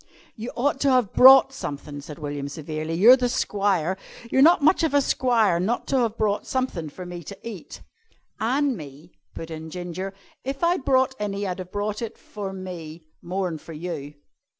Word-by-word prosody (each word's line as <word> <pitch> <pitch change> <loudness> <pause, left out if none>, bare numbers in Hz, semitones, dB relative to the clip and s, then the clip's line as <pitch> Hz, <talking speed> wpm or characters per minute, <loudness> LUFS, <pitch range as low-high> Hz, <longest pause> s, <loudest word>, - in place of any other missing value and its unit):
"You 230 +2 -6
ought 270 +3 0
to 280 - +2
have 250 -6 +2
brought 265 +1 +8
sumthin'," 145 - -6
said 150 -1 -9
William 145 -2 -4
severely. 155 +2 -4
"You're 225 +9 +8
the 250 -1 0
squire. 195 -6 0 0.3
You're 265 - +4
not 325 +1 +6
much 315 +5 +5
of 320 -3 +1
a - - +7
squire 230 -9 +2
not 220 +7 -1
to 270 - +2
have 230 -2 0
brought 210 -1 0
sumthin' 255 - -2
for 180 +5 -9
me 175 -1 -7
to - - -9
eat." 210 -6 -9 0.6
"An' 265 +4 +1
me," 150 0 -11 0.2
put 165 0 -7
in 160 0 -7
Ginger. 180 +3 -5 0.3
"If 270 +4 -4
I'd 345 -3 +2
brought 260 0 +3
any 205 -1 -2
I'd 185 -1 -3
have 185 0 -7
brought 205 +1 -3
it 230 - -5
for 200 -2 -7
me 175 -4 -8 0.2
more'n 180 -2 -3
for 165 - -11
you." 150 -3 -6
195 Hz, 185 wpm, -24 LUFS, 165-250 Hz, 0.6 s, brought